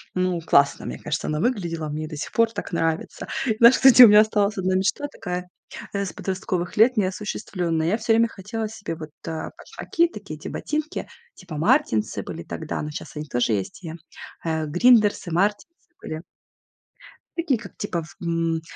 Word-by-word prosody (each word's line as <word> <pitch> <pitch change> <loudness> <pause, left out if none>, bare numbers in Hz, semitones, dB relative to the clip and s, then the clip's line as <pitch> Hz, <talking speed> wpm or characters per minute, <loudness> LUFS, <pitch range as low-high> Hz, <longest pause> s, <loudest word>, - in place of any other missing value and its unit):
Ну, 185 -2 0
классно, 140 -3 +3
мне - - -5
кажется, 150 +1 -3
она 150 0 -1
выглядела, 170 -9 -1
мне 155 +1 -4
до 155 - -7
сих - - -5
пор 230 -1 +3
так 200 - -6
нравится. 165 -1 -2 0.3
Знаешь, 235 +2 +8
кстати, 255 -2 +9
у - - +11
меня 210 +1 +8
осталась 215 -1 +2
1 185 0 0
мечта 195 +10 0
такая, 180 -5 -5 0.4
э, 200 0 -1
с - - -5
подростковых 185 -2 -3
лет 230 +3 +5
неосуществлённая. 185 -4 -1
Я 210 +6 +2
всё 225 0 -1
время 230 +1 +4
хотела 220 +2 -5
себе 210 -6 -6
вот, 155 -1 -9 0.2
э, 160 -1 -4
башмаки 340 0 -1
такие, - - -8
эти - - -7
ботинки 305 0 -3 0.3
типа 180 -4 -10
"Мартинсы" 165 - +1
были - - -7
тогда, - - -5
но 150 - -4
сейчас - - -8
они 150 0 -5
тоже 120 -4 0
есть, 100 - -3
и, 165 -2 -6 0.5
э, 160 -1 -1
"Гриндерсы", 205 +2 +3
"Мартинсы" 210 - -2
были. 155 0 -6 1.2
Такие, 300 -9 +1
как, 200 -5 -12
типа, 180 -4 -2
в 165 - -14
м, 165 -1 0
185 Hz, 175 wpm, -24 LUFS, 160-225 Hz, 1.2 s, у